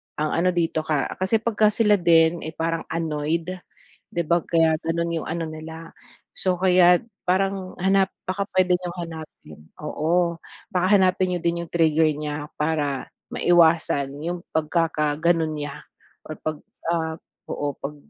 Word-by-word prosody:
ang 155 0 -1
ano 180 +2 +2
dito 165 -2 +1
ka 150 -2 0
kasi 215 +4 +1
pagka 215 -2 +3
sila 210 -3 +3
din 165 0 +4
ay 160 - -6
parang 165 0 -2
annoyed, 165 +1 -2 0.6
di 170 -1 -2
ba 170 +2 +2
kaya 160 -2 +2
ganun 170 +1 -1
yung - - -8
ano 165 +1 -2
nila. 160 +1 -9 0.5
So 185 -1 +1
kaya't 180 -1 +5 0.2
parang 190 0 0
hanap 195 0 +3
baka 195 +2 -2
puwede 185 -1 +3
niyong 180 0 -6
hanapin 160 - -10 0.2
oo 170 +2 0 0.3
baka 180 0 +1
hanapin 185 -1 +3
niyo - - -2
din 170 0 0
yung - - -20
trigger 160 -1 +3
niya 150 0 -4
para 150 -3 -1 0.2
maiwasan 160 -5 +3
yung 175 +1 -3 0.2
pagkakaganon 160 0 +1
niya 145 -1 -6 0.4
or 155 - -8
pag, 155 -1 -3 0.4
ah, 160 -1 -2 0.3
oo 145 -1 -2
pag 150 +2 -4
165 Hz, 145 wpm, -24 LUFS, 155-180 Hz, 0.6 s, kaya't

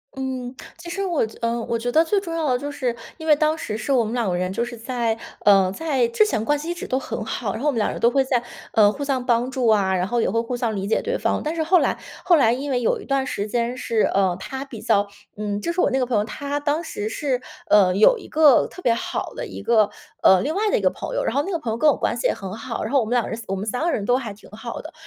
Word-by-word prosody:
嗯， 260 -1 -4 0.2
其 340 0 -9
实 395 +2 -2
我 345 -10 +1
觉 220 - -11
呃， 235 0 0
我 230 - -1
觉 245 +2 -2
得 320 +5 +4
最 400 +5 +2
重 335 -4 -6
要 320 -3 -1
的 250 - +1
就 290 +1 -4
是， 250 -4 -2 0.2
因 320 - -8
为 305 -2 +6
当 310 +1 +1
时 215 -9 -4
是 275 - -3
我 255 -3 +4
们 220 +1 -4
2 235 -5 0
个 175 - 0
人 185 +1 -1
就 230 - 0
是 240 0 -6
在， 230 -1 -1 0.2
呃， 195 -2 +5
在 270 -2 0
之 430 - +4
前 220 - -1
关 295 +3 +2
系 320 - -6
一 345 - 0
直 345 - -7
都 260 - 0
很 220 - -5
好。 215 -2 -3
然 - - -5
后 - - +1
我 295 - +4
们 235 - -2
2 210 - +2
个 - - -3
人 - - -6
都 235 +1 +4
会 270 0 +3
在 250 -2 0 0.3
呃， 210 -3 +6
互 285 +7 -5
相 265 -3 -1
帮 240 +1 +2
助 260 -2 -2
啊， 200 -4 +3
然 180 0 0
后 235 +2 0
也 - - +1
会 230 +4 +1
互 235 +2 -2
相 235 -3 -1
理 195 0 -3
解 220 - +1
对 480 +3 -1
方。 - - 0
但 310 +2 -2
是 320 - 0
后 360 +3 +4
来， - - 0 0.3
后 350 - +5
来 235 -6 +4
因 275 +4 -4
为 255 -2 +1
有 230 - +1
一 - - -11
段 275 -1 0
时 210 -5 -3
间 235 +2 -1
是， 230 -3 -1
呃， 190 -3 +2
她 265 0 -5
比 235 -6 -9
较， 205 -2 +2 0.3
嗯， 205 -1 -3
就 340 - -1
是 360 - +1
我 - - +3
那 265 - 0
个 255 - +1
朋 245 -1 -1
友， 210 - +3
她 285 +6 -4
当 295 +3 -1
时 215 -9 -4
是， 255 0 -2 0.3
呃， 190 -3 +5
有 445 - +5
一 - - -12
个 300 -5 +5
特 365 - -12
别 235 - +4
好 230 - -4
的 - - -5
一 - - -8
个， 220 -3 +3 0.3
呃， 190 -1 +6
另 300 - -1
外 420 +4 +1
的 - - +2
一 - - -2
个 - - +3
朋 - - -6
友。 - - 0
然 - - -1
后 285 - +3
那 380 - -4
个 345 - 0
朋 245 -9 -4
友 225 - -2
跟 305 +5 +4
我 285 - +2
关 - - 0
系 240 - 0
也 - - +1
很 190 -1 -7
好， 230 +2 -5
然 220 - -4
后 275 - +5
我 230 - 0
们 220 - -6
2 240 - +3
个 - - -6
人， 225 - -4
我 195 - -2
们 195 +2 -4
3 235 +3 -2
个 340 - +1
人 205 -9 -2
都 245 - +3
还 235 -5 -5
挺 215 - -17
好 225 +3 -7
的。 315 +3 -10
245 Hz, 335 characters per minute, -22 LUFS, 220-290 Hz, 0.3 s, 为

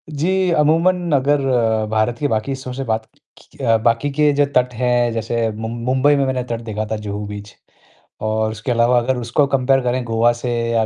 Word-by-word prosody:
जी, 180 +5 0
अमूमन 170 +3 +2
अगर 140 +1 +2 0.5
भारत 110 +2 0
के 145 - 0
बाकी 110 0 -1
हिस्सों 130 -1 -5
से 135 +2 -4
बात 110 -2 -2 0.3
की - - -20
अ, 115 -1 +4
बाकी 115 +5 +1
के 150 +1 +3
जो 145 0 +3
तट 125 0 +2
हैं, 120 0 +1
जैसे 115 0 -1
मुंब 110 +2 -6
मुंबई 135 +3 +3
में 140 -1 +1
मैंने 130 -1 -1
तट 115 -2 -5
देखा 110 0 -3
था - - 0
जुहू 105 0 -5
बीच 105 0 -8 0.7
और 110 0 0
उसके 110 +3 -4
अलावा 120 +1 +3
अगर 125 +2 -1
उसको 120 +4 +1
कंपेयर 135 0 +2
करें 125 +1 -1
गोवा 115 +1 +2
से 125 - -2 0.2
या 115 -1 +2
120 Hz, 200 wpm, -19 LUFS, 110-140 Hz, 0.7 s, अ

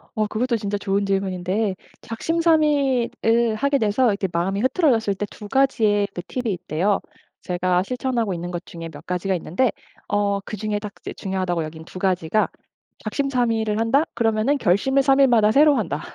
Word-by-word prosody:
어 215 -2 +1
그것도 235 +3 0
진짜 205 -1 -2
좋은 200 0 0
질문인데 195 +1 -1 0.3
작심삼일을 260 -5 +1
하게 280 +5 +1
돼서 220 +4 +2
이렇게 200 -2 -1
마음이 185 +4 -1
흐트러졌을 250 - +2
때 205 - -3
2 210 - -10
가지의 215 -5 +2
그 175 - -5
팁이 245 -4 -2
있대요. 180 +3 0 0.4
제가 180 0 0
실천하고 245 -2 -1
있는 175 +1 -5
것 175 0 -5
중에 165 -1 -8
몇 145 -2 -12
가지가 180 +2 -1
있는데 190 +9 0 0.4
어 205 -1 +1
그중에 210 +1 -3
딱 210 -1 -7
이제 - - -6
중요하다고 185 -3 -2
여긴 160 +1 -8
2 185 - -9
가지가 185 +1 +1 0.5
'작심삼일을 225 -3 0
한다.' 265 +8 +2
그러면은 225 +5 +1
'결심을 265 +6 +2
3 270 0 +4
일마다 235 -6 +5
새로 290 +4 +5
한다.' 165 - -2
215 Hz, 365 characters per minute, -22 LUFS, 190-250 Hz, 0.5 s, 일마다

